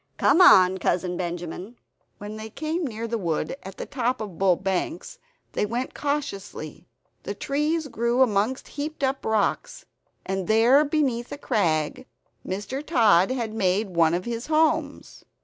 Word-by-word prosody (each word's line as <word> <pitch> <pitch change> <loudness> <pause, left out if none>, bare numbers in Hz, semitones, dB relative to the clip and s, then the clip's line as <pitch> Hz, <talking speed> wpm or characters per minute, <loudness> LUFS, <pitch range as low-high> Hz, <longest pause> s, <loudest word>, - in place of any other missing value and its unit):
Come 360 - +4
on, 190 - +7
Cousin 180 0 0
Benjamin!" 175 +5 -5 0.4
When 205 +1 -7
they 220 0 -7
came 315 +6 -3
near 230 -1 -5
the 230 0 -2
wood 165 -1 -2
at 190 0 -10
the - - -5
top 255 -2 -1
of 200 -7 -7
Bull 190 -2 +4
Banks, 195 - -3 0.3
they - - -1
went 235 +5 -3
cautiously. 270 - -4 0.3
The 200 - -5
trees 300 +7 -1
grew 235 +1 +2
amongst 220 +2 0
heaped 295 0 -5
up 270 0 0
rocks; 220 -2 -1 0.4
and 190 -1 -3
there, 235 +7 +5
beneath 275 -6 -1
a - - -5
crag, 160 - -1 0.4
Mr. 205 +9 -4
Tod 215 - +4
had 235 -4 -2
made 200 0 +1
one 165 0 +4
of 180 - -3
his 235 0 -4
homes. 315 0 0
220 Hz, 150 wpm, -25 LUFS, 190-270 Hz, 0.4 s, on